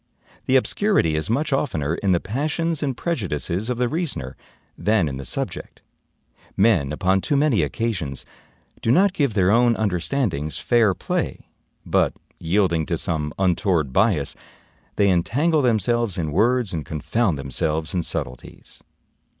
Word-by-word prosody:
The 130 - +3
obscurity 135 - +2
is 75 +5 -2
much 140 +5 0
oftener 80 - -1
in 95 +3 0
the 85 - +3
passions 150 - -2
and 135 -4 -2
prejudices 100 - -2
of 125 - -1
the 125 0 +1
reasoner 135 - -3 0.4
than 105 -5 +1
in 65 -2 -4
the 70 - -7
subject. - - -5 0.7
Men, 95 -9 +3
upon 95 +5 +1
too 145 - 0
many 140 -6 +3
occasions, 90 - -2 0.6
do - - -1
not 185 +9 +4
give 140 - 0
their 95 -1 +3
own 120 +1 +4
understandings 90 - -1
fair 115 -6 +2
play; - - -2 0.5
but, - - +2 0.3
yielding 85 -2 +1
to 85 - -1
some 75 -2 -2
untoward 90 -6 +1
bias, 95 -9 +2 0.6
they 100 - +3
entangle 145 - +2
themselves 120 -3 +1
in 80 -3 -2
words 120 +4 +2
and 80 -2 -3
confound 85 +5 -1
themselves 75 +3 -2
in 90 - +1
subtleties. 65 -6 -6
100 Hz, 140 wpm, -22 LUFS, 80-125 Hz, 0.7 s, not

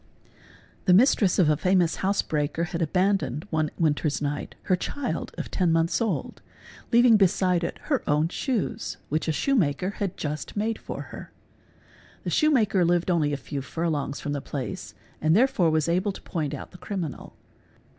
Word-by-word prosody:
The 180 -3 +6
mistress 205 -4 +4
of 180 - +4
a 150 - +4
famous 180 +1 +2
house 195 +1 +1
breaker 150 +2 -1
had 175 0 -3
abandoned, 180 -4 +1
one 155 -1 +1
winter's 155 -2 +1
y: 145 - -1
night, 145 - -6
her 185 - +2
child 265 +8 -3
of - - -5
ten 180 -3 +2
months 165 +6 +2
old, 225 - -2 0.5
leaving 235 -1 +6
beside 185 -3 +2
it 170 - -3
her 280 -4 0
own 150 +2 +3
shoes 235 - -2
which 155 +2 0
_ - - -8
a@shoe 160 - +1
maker 180 - +1
had 195 -2 -2
just 150 +5 -4
made 220 +2 -1
for - - -6
her. - - -9 0.9
The - - -3
shoe 305 - +3
maker 210 -10 +3
lived 175 +1 +2
only 155 -4 +2
a 145 - -1
few 140 0 -5
furlongs 150 0 -2
from 145 - -4
the 140 - -3
place 130 -9 -6 0.3
and 155 +2 +3
therefore 215 -7 +3
was 155 -1 +1
able 185 +4 +1
to - - -11
point 155 -5 -3
out - - -9
the 180 - -13
criminal. 180 -6 -5
175 Hz, 180 wpm, -26 LUFS, 155-200 Hz, 0.9 s, The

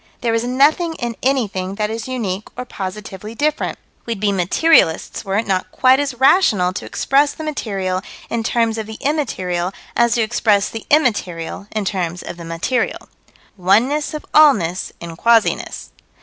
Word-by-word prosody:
There 230 -2 0
is 230 0 +1
nothing 295 +7 +2
in 240 -5 -4
anything 200 -8 -1
that 210 +1 -1
is 225 +1 -5
unique 215 -6 -3
or 250 - -4
positively 210 +1 -7
different. 300 +4 -1 0.3
We'd 230 -3 -3
be 205 0 +1
materialists 190 - +2
were 195 0 -1
it 225 - 0
not 190 -2 -1
quite 260 +1 +4
as 280 -3 -2
rational 235 - +4
to - - -5
express 285 +2 +2
the 315 - -8
material 195 -11 -2 0.3
in 235 - -2
terms 225 -1 0
of 215 - -5
the 220 - -8
immaterial 185 - -1 0.2
as 235 -1 +3
to 235 - +2
express 215 -2 +2
the 225 - -8
immaterial 200 - 0
in 215 -2 -3
terms 180 -3 -2
of - - -7
the 170 - -9
material. 165 +10 -2 0.5
Oneness 240 - +2
of 305 - -7
allness 205 - +4
in 170 -1 -8
quasiness. 230 +4 +1
220 Hz, 165 wpm, -19 LUFS, 190-260 Hz, 0.5 s, quite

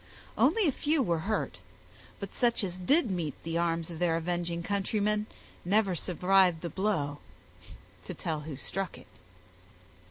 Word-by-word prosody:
Only 435 -6 +4
a - - +4
few 295 +2 +1
were 170 -6 +1
hurt; 215 - -1 0.6
but - - -6
such 240 -2 +2
as 185 -1 -3
did 260 - +3
meet 165 -6 -2
the 165 +1 -1
arms 170 0 0
of 165 - -7
their 175 -2 +2
avenging 170 0 -2
countrymen 210 +2 0 0.4
never 200 +1 +3
survived 180 0 +3
the 170 - -3
blow, 155 -8 -1 0.9
to - - -6
tell 160 -2 -2
who 150 -1 -6
struck 185 +4 -3
it. 125 - -14
180 Hz, 150 wpm, -30 LUFS, 165-210 Hz, 0.9 s, Only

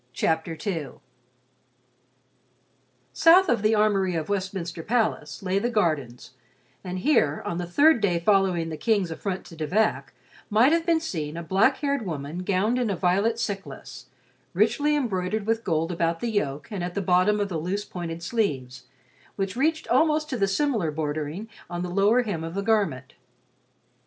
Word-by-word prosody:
CHAPTER 160 0 -1
II 165 -9 -3 2.2
South 340 +4 +6
of 235 - +2
the 215 +1 +3
armory 200 -4 +2
of 160 -1 -3
Westminster 185 -4 -3
Palace 215 -6 -1
lay 190 +1 +1
the 240 - -1
gardens, 155 - -1 0.5
and 185 0 -5
here, 185 - +2
on 170 - -3
the 175 - -4
third 285 - +4
day 180 -4 +2
following 185 -3 +2
the 155 - -5
King's 200 -2 +1
affront 190 +3 -4
to 165 - -12
De 155 -1 -4
Vac, 165 -9 0 0.4
might 225 +7 +4
have 335 +1 +1
been 335 -1 +3
seen 160 - -4
a 170 - -5
black 195 - +3
haired 280 -4 -1
woman 155 -2 -5
gowned 200 +6 0
in 240 -3 0
a 200 - 0
violet 195 +6 +1
cyclas, 200 -4 -6 0.5
richly 295 0 +2
embroidered 215 -6 -1
with 225 +1 0
gold 165 -1 0
about 165 -1 -1
the 235 - -2
yoke 145 -8 -2
and 195 -4 -3
at 175 0 -5
the 200 - 0
bottom 185 +4 +3
of 200 -1 -1
the 165 -4 -2
loose 195 +6 -3
pointed 170 -3 -6
sleeves, 135 - -2 0.5
which 195 -1 -3
reached 315 +5 0
almost 310 -1 +3
to - - -1
the 200 -4 +1
similar 220 - 0
bordering 155 +5 -4 0.2
on 175 0 -4
the 180 - -4
lower 205 +7 +3
hem 180 -8 -3
of 165 +2 -6
the 200 - -2
garment. 195 - 0
190 Hz, 170 wpm, -25 LUFS, 165-220 Hz, 2.2 s, South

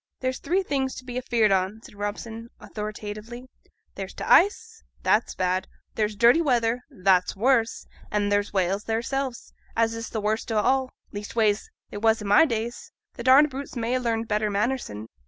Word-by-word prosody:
'There's 255 -1 -2
three 380 +3 0
things 270 -5 -1
to 255 - -9
be 245 -1 -7
afeared 235 -4 +2
on,' 190 +3 +1
said - - -13
Robson, 220 +3 -5
authoritatively: 215 +3 -7 0.5
'there's - - -7
t' - - -6
ice, 450 +4 +3 0.2
that's 220 - +2
bad; 185 0 0 0.3
there's 210 -1 -1
dirty 235 +9 +5
weather, 245 -5 +1
that's 190 -7 +2
worse; 240 +2 +1 0.2
and 205 -1 0
there's 205 0 +1
whales 195 +1 0
theirselves, 240 +3 -3 0.2
as 225 0 +2
is 230 0 -5
t' - - -4
worst 215 +2 -1
of 215 -1 +1
all; 265 0 +2 0.2
leastways, 210 0 0 0.2
they - - -6
was 225 +1 +3
i' 210 - -7
my 205 +11 +6
days; 235 -3 -4 0.2
t' - - -7
darned 270 +4 +6
brutes 275 +2 -7
may 235 0 -1
ha' 255 - +1
larnt 230 -1 -1
better 210 0 0
manners 240 +6 0
sin'. 105 +1 -7
225 Hz, 175 wpm, -25 LUFS, 210-255 Hz, 0.5 s, my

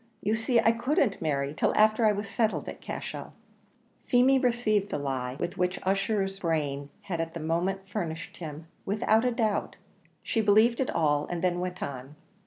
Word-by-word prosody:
You 210 - +1
see 225 +2 +2
I 225 0 +5
couldn't 240 -1 0
marry 140 -3 -1
till - - +1
after 215 +1 +4
I - - +5
was 205 0 -3
settled 220 +1 0
at - - -7
Cashel." - - -6 0.7
Feemy 260 +2 +5
received 230 -5 +1
the - - -2
lie 130 -3 -3
with 175 0 -4
which 180 +1 +1
Ussher's 195 0 0
brain 145 -5 -1
had 170 -4 -2
at 165 0 -5
the - - -3
moment 180 +5 -1
furnished 170 -6 -5
him, 155 -2 -7 0.2
without 215 +3 +2
a 250 - +3
doubt; 220 -3 -1 0.5
she 225 - 0
believed 220 +3 +4
it 265 - 0
all, 145 -2 +1
and 175 -1 -4
then 175 -1 +1
went 180 0 -4
on. 135 +1 -6
195 Hz, 180 wpm, -28 LUFS, 160-220 Hz, 0.7 s, I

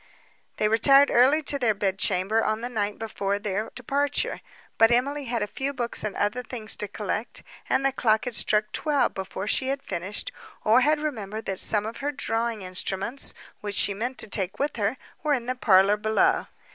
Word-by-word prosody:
They 215 - +2
retired 275 +6 +5
early 270 +6 +5
to 280 0 0
their 225 -5 +2 0.2
chamber 195 +3 +1
on 215 +1 -1
the 245 - -4
night 210 -3 -2
before 200 -3 -2
their 205 +1 -3
departure; 285 +1 -1 0.4
but 225 - +7
Emily 275 +4 +1
had 235 -3 -1
a - - 0
few 275 +7 -3
books 240 -2 -2
and 215 -2 -3
other 205 +5 0
things 230 -3 -4
to 210 - -2
collect, 210 +2 -4 0.3
and 270 - +2
the 275 - +3
clock 220 -4 +1
had 250 - -3
struck 210 0 +2
twelve 295 -3 +1
before 190 0 -5
she 260 +4 +1
had 275 +1 -2
finished, 190 - -4 0.3
or 225 +4 +5
had 300 +3 +3
remembered 220 -8 -4
that 190 -1 -3
some 210 -1 +3
of 225 - -6
her 285 +1 -2
drawing 230 -5 -2
instruments, 190 +7 -3 0.2
which 205 -1 -4
she 200 - +4
meant 245 +6 -4
to - - -1
take 190 -2 0
with 290 -1 -2
her, 215 +4 0 0.2
were 300 -2 +2
in 240 -3 -4
the 255 - -1
parlour 205 -4 +4
below. 370 - +2
225 Hz, 195 wpm, -25 LUFS, 205-265 Hz, 0.4 s, but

